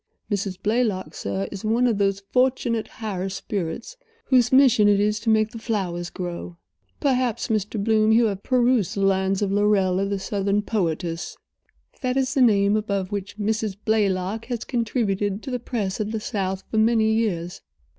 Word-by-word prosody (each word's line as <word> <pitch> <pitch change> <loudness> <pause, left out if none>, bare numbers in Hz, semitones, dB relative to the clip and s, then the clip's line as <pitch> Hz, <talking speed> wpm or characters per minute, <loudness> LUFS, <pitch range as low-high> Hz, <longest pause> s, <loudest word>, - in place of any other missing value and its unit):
Mrs. 195 -2 -2
Blaylock, 210 -7 0
sir, 100 0 -3
is 190 - -7
one 230 +3 +2
of 225 -4 +1
those 195 0 +1
fortunate 250 -3 +1
higher 195 -4 -4
spirits 200 - -4 0.3
whose 250 -3 +3
mission 260 -6 +6
it 205 -1 +4
is 210 +1 +1
to 225 +2 -2
make 215 0 +3
the 230 - -8
flowers 180 -7 -2
grow. 175 -1 -6 0.4
Perhaps, 255 -5 0
Mr. 215 0 -1
Bloom, 220 0 +3
you 230 +1 +5
have 200 -3 -2
perused 245 -6 +2
the 200 - -2
lines 195 0 +2
of 195 - -1
Lorella, 195 -2 +2
the 200 0 -1
Southern 200 +1 -1
poetess. 170 -4 -2 0.6
That 255 -1 0
is 265 -1 +1
the 270 - +2
name 205 -4 +4
above 200 -3 -2
which 200 0 -5
Mrs. 215 -1 -1
Blaylock 205 0 0
has 240 -3 -4
contributed 210 -4 -1
to 270 - -5
the 250 - -2
press 220 -5 -3
of 215 0 -2
the 220 - -2
South 195 -3 -3
for 220 - -1
many 220 -1 +3
years." 180 -6 -1
210 Hz, 170 wpm, -24 LUFS, 195-230 Hz, 0.6 s, mission